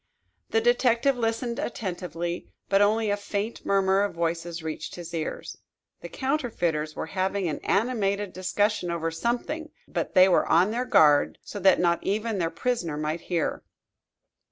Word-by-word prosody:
The 225 - +2
detective 245 +2 +3
listened 235 0 -2
attentively, 175 -5 -4 0.2
but 195 0 +4
only 215 +1 +3
a - - +2
faint 205 +2 -4
murmur 195 0 +3
of 200 -4 -1
voices 170 0 -2
reached 155 -1 -5
his 175 -1 -8
ears. 160 -2 -4 0.4
The - - -8
counterfeiters 175 - -1
were - - -3
having 190 0 -1
an 155 - -3
animated 205 -3 0
discussion 185 +1 0
over 165 -1 -2
something, 245 - -2 0.2
but - - -3
they 185 0 +8
were 185 - +3
on 180 +5 +4
their 245 +3 -1
guard 150 -9 +4
so 205 - -7
that 190 -1 +5
not 170 -1 +2
even 215 +1 -1
their 165 -2 +1
prisoner 170 -4 -2
might 155 +2 -2
hear. 170 -3 -2
195 Hz, 155 wpm, -26 LUFS, 170-225 Hz, 0.4 s, they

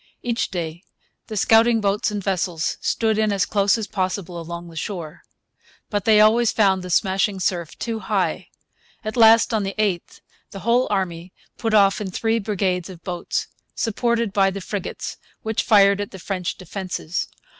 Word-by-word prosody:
Each 235 -1 -1
day 170 -2 -4 0.5
the 215 - -5
scouting 225 +3 +5
boats 205 0 +1
and 205 -2 -4
vessels 180 -4 -1
stood 220 -1 +1
in 215 -1 +2
as 195 -2 +1
close 200 0 +2
as 220 - -3
possible 185 -3 -3
along 170 +1 -7
the 165 - -12
shore. 165 -2 -5 0.7
But 205 -2 -1
they 215 -1 +6
always 220 +2 +5
found 195 -3 +3
the 180 - -7
smashing 190 +2 +1
surf 175 -3 -2
too 230 -1 -3
high. 190 -7 -1 0.6
At 215 +2 -4
last, 230 0 +6
on 220 - +2
the 195 0 -3
8th, 200 -5 -1 0.3
the 195 - -9
whole 240 +3 +2
army 185 -3 -2 0.2
put 225 -2 0
off 200 -1 +4
in 200 - -3
three 225 +4 0
brigades 190 -4 -1
of 175 -3 -11
boats, 175 -2 -3 0.3
supported 235 -1 0
by 195 -1 +4
the 195 +1 -5
frigates, 195 0 -5 0.3
which 220 0 0
fired 200 -2 +5
at 205 - -4
the 190 - -10
French 185 -1 -4
defences. 185 -2 -4
200 Hz, 170 wpm, -22 LUFS, 180-215 Hz, 0.7 s, they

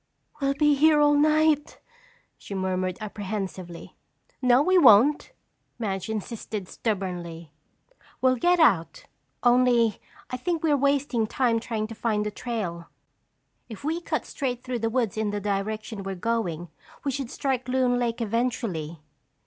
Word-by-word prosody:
"We'll 275 -1 0
be 295 0 +4
here 300 +2 +4
all 295 0 +5
night," 305 0 +2 0.6
she 200 - -8
murmured 185 -1 -1
apprehensively. 195 -4 -6 0.5
"No, 250 +1 +5
we 370 +4 +2
won't," 275 - +6 0.5
Madge 195 -4 -3
insisted 215 -2 -5
stubbornly. 175 -7 -4 0.7
"We'll 255 0 +3
get 350 +8 +3
out, 195 - +2 0.4
only 245 -3 +3 0.3
I 250 - -2
think 330 +5 -2
we're 305 -3 +3
wasting 280 -4 +1
time 235 -1 +1
trying 225 -2 -3
to 225 - -7
find 215 -2 -1
the 210 - -2
trail. 200 -8 -5 0.8
If 220 +1 -9
we 325 +4 -1
cut - - -2
straight 250 -3 -4
through 250 -2 -3
the 225 0 0
woods 225 -4 -1
in 215 -1 0
the 205 0 -2
direction 210 +2 -3
we're 195 0 -4
going 175 -5 -2 0.3
we 280 - 0
should 270 -2 -4
strike 260 -2 -2
Loon 250 -1 +2
Lake 235 -1 -1
eventually." 210 - -2
230 Hz, 140 wpm, -26 LUFS, 200-270 Hz, 0.8 s, won't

